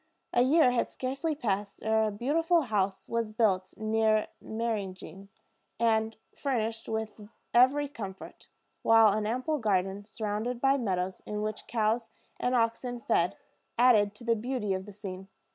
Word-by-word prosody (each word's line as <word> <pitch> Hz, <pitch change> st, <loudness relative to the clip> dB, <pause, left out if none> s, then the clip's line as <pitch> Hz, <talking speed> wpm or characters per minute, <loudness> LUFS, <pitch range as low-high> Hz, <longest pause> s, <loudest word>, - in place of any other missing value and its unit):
A 240 Hz, -, +4 dB
year 265 Hz, +1 st, +5 dB
had 245 Hz, -, 0 dB
scarcely 275 Hz, +5 st, -2 dB
passed 205 Hz, -6 st, -3 dB
ere 220 Hz, 0 st, +2 dB
a -, -, -2 dB
beautiful 325 Hz, -, +2 dB
house 200 Hz, -5 st, -1 dB
was 230 Hz, -2 st, -1 dB
built 195 Hz, -4 st, +1 dB
near 220 Hz, 0 st, +1 dB
Meyringen, 200 Hz, -4 st, -4 dB, 0.5 s
and 225 Hz, -1 st, +2 dB, 0.2 s
furnished 225 Hz, -5 st, -2 dB
with 220 Hz, -1 st, -4 dB, 0.2 s
every 265 Hz, +4 st, +5 dB
comfort; 200 Hz, -9 st, -9 dB, 0.3 s
while 225 Hz, -1 st, +6 dB
an 210 Hz, 0 st, -1 dB
ample 255 Hz, +7 st, -1 dB
garden, 195 Hz, -2 st, 0 dB
surrounded 220 Hz, +3 st, -3 dB
by 270 Hz, +2 st, +4 dB
meadows, 190 Hz, -7 st, -2 dB
in 210 Hz, 0 st, -3 dB
which 215 Hz, 0 st, -4 dB
cows 225 Hz, 0 st, 0 dB, 0.3 s
and 250 Hz, +1 st, +1 dB
oxen 240 Hz, +1 st, 0 dB
fed, 175 Hz, -6 st, +1 dB, 0.4 s
added 215 Hz, -4 st, +5 dB
to 235 Hz, -, -11 dB
the 230 Hz, 0 st, +2 dB
beauty 230 Hz, -3 st, -2 dB
of 190 Hz, +1 st, -4 dB
the 205 Hz, -, -10 dB
scene. 190 Hz, -2 st, -7 dB
220 Hz, 145 wpm, -29 LUFS, 205-245 Hz, 0.5 s, while